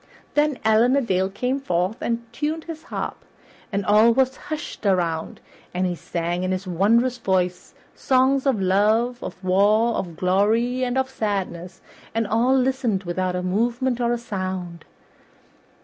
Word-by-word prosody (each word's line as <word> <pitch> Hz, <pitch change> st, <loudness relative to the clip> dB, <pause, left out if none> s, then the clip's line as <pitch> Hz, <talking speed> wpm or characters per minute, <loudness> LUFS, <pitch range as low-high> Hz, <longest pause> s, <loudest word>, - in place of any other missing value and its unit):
Then 295 Hz, -2 st, +2 dB
Allan 225 Hz, +4 st, +4 dB
a 280 Hz, -, +3 dB
Dale 190 Hz, -5 st, 0 dB
came 250 Hz, +7 st, -2 dB
forth 180 Hz, -4 st, -1 dB
and 235 Hz, 0 st, -2 dB
tuned 310 Hz, +6 st, -2 dB
his 320 Hz, -1 st, -8 dB
harp, -, -, -5 dB, 0.5 s
and 200 Hz, -1 st, -1 dB
all 215 Hz, +3 st, +5 dB
was 260 Hz, +2 st, +2 dB
hushed 310 Hz, -1 st, -7 dB
around, 170 Hz, -5 st, 0 dB, 0.3 s
and 185 Hz, +1 st, +1 dB
he 180 Hz, -, 0 dB
sang 175 Hz, 0 st, -3 dB
in 185 Hz, 0 st, -1 dB
his 185 Hz, +1 st, -2 dB
wondrous 230 Hz, +8 st, +2 dB
voice 180 Hz, -4 st, -1 dB, 0.2 s
songs 265 Hz, +1 st, +2 dB
of 255 Hz, -6 st, +2 dB
love, 215 Hz, +6 st, +2 dB
of -, -, -6 dB
war, 205 Hz, +5 st, +3 dB
of 170 Hz, -3 st, -4 dB
glory, 220 Hz, +7 st, +1 dB
and 250 Hz, 0 st, -1 dB
of 265 Hz, 0 st, +1 dB
sadness, 190 Hz, -7 st, -4 dB, 0.3 s
and 225 Hz, 0 st, +1 dB
all 235 Hz, +5 st, +2 dB
listened 255 Hz, -6 st, 0 dB
without 180 Hz, +1 st, -2 dB
a 180 Hz, -, -2 dB
movement 240 Hz, +6 st, 0 dB
or 235 Hz, 0 st, +1 dB
a 240 Hz, -, +1 dB
sound. 185 Hz, -6 st, -5 dB
215 Hz, 155 wpm, -23 LUFS, 185-250 Hz, 0.5 s, all